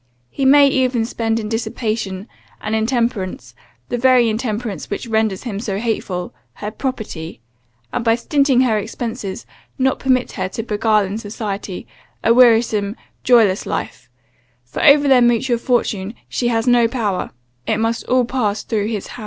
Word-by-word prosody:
He 275 - -2
may 280 +1 +7
even 255 -4 +1
spend 225 -1 -1
in 215 - -4
dissipation, 220 -3 -3 0.3
and 215 - -4
intemperance, 220 - -1 0.4
the 245 - -2
very 250 -2 +4
intemperance 220 - -3
which 200 - -4
renders 220 -4 0
him 215 -6 -4
so 205 -3 -3
hateful, 200 - -3 0.2
her 210 - -6
property, 215 - -5 0.5
and 245 - -1
by 225 -1 +3
stinting 275 +1 +2
her 220 -4 +2
expences, 225 -1 -5 0.3
not 265 0 +1
permit 255 -1 +1
her - - -3
to 225 - -5
beguile 215 -1 +1
in 200 +3 -4
society, 205 -3 -5 0.4
a 230 - +5
wearisome, 225 -4 +4 0.3
joyless 225 -6 +4
life; - - -5 0.6
for 125 - -5
over 290 0 +6
their 260 -2 +6
mutual 240 0 +2
fortune 220 -4 -1
she 240 - -1
has 225 -1 0
no 245 -2 +4
power, 215 -6 -2 0.4
it 220 - +1
must 225 +1 -1
all 255 -1 +2
pass 220 -4 -1
through 210 -3 -1
his 215 -3 -3
hand. 245 - -10
225 Hz, 155 wpm, -19 LUFS, 210-245 Hz, 0.6 s, may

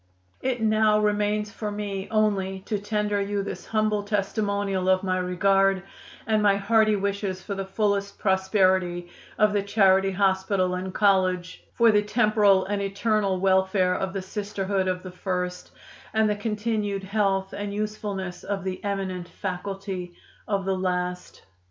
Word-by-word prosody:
"It 255 -3 -1
now 215 -1 +4
remains 210 0 0
for 210 0 -4
me 205 -2 -4
only 195 -3 0
to 210 +2 -3
tender 210 0 -1
you 200 0 -1
this - - -7
humble 215 -1 +1
testimonial 200 -2 -1
of 185 0 +3
my 185 -1 0
regard 195 +1 +2 0.4
and 215 -1 +2
my 205 -1 +4
hearty 215 +2 +3
wishes 200 -1 -2
for 200 - -4
the 195 -1 -4
fullest 200 0 -1
prosperity 190 -3 +1 0.3
of 210 -1 +3
the 205 - +2
Charity 195 -1 +3
Hospital 190 -1 +1
and 185 +1 -3
College, 185 -3 +1
for 235 -1 +5
the 210 -1 +4
temporal 210 -3 +3
and 200 +1 -2
eternal 200 -1 0
welfare 190 -1 +2
of 190 +1 -2
the 195 -1 -4
Sisterhood 200 -1 -2
of 185 0 -2
the 185 - -7
first, 180 -1 -3 0.5
and 220 0 +4
the 210 - +1
continued 210 -1 -2
health 195 -1 0
and 205 0 -4
usefulness 205 -3 -4
of 200 -2 -3
the 185 -1 -4
eminent 190 -3 -3
faculty 190 -1 -5 0.3
of 200 -2 -1
the 190 0 +1
last." 180 -1 -3
195 Hz, 150 wpm, -25 LUFS, 190-210 Hz, 0.5 s, for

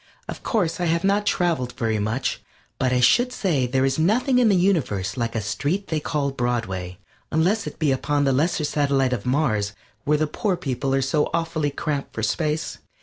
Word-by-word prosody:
Of - - -7
course 180 -8 0
I 175 - 0
have 165 0 +1
not 200 +1 +2
traveled 160 -9 0
very 115 -3 -1
much, 110 +6 -2 0.4
but 130 -1 +1
I 125 -1 +2
should 245 - +4
say 165 - 0
there 130 +2 +1
is 135 +2 0
nothing 245 - +3
in 240 -3 +4
the 200 - +4
universe 160 - +1
like 115 -2 -2
a 110 - 0
street 145 - -2
they 160 - 0
call 145 -2 -1
Broadway 110 -9 -2 0.3
unless 185 +7 +1
it - - -7
be 155 -4 +1
upon 145 +2 0
the 135 -1 +2
lesser 155 +4 +1
satellite 140 -3 +1
of 120 0 -4
Mars, 115 -7 +1 0.3
where 150 +1 +2
the 155 - +1
poor 190 +4 -1
people 135 -4 -1
are 135 - +1
so 150 +3 +1
awfully 165 -3 -1
cramped 145 0 -4
for 110 - -3
space. 150 +10 -1
145 Hz, 200 wpm, -23 LUFS, 125-170 Hz, 0.4 s, should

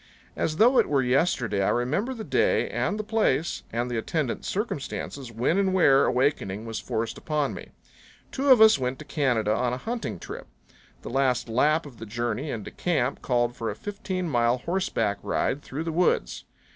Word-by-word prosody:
As 155 -1 -1
though 245 +6 +5
it - - +2
were 140 -2 +2
yesterday 125 - +1
I 95 - +2
remember 155 - 0
the 225 - -6
day - - +2
and 210 - -1
the 215 - -3
place 215 -7 0
and 120 +2 -1
the 120 -2 -2
attendant 140 +2 -2
circumstances 140 - -4
when 125 - +1
and 190 -1 +1
where 140 -7 +5
awakening 125 -6 0
was 115 -1 -4
forced 110 0 -3
upon 150 -2 -1
me. - - -9 0.6
Two 275 +1 -1
of 255 -4 +7
us 220 -9 +7
went 130 0 -2
to 150 - -10
Canada 120 -9 +1
on 125 +1 0
a - - -2
hunting 230 - -4
trip. - - -8 0.6
The - - -6
last 130 -2 +1
lap 150 +8 +2
of 135 -5 -12
the 115 - -8
journey 120 +5 -3
into 115 -6 -5
camp 140 -7 -1
called 120 -1 0
for 115 -1 -3
a 105 - -4
fifteen 190 - -4
mile 120 -3 +2
horseback 125 - -1
ride 140 - -1
through 145 +4 -5
the 165 - -3
woods. 165 - 0
135 Hz, 185 wpm, -26 LUFS, 120-175 Hz, 0.6 s, of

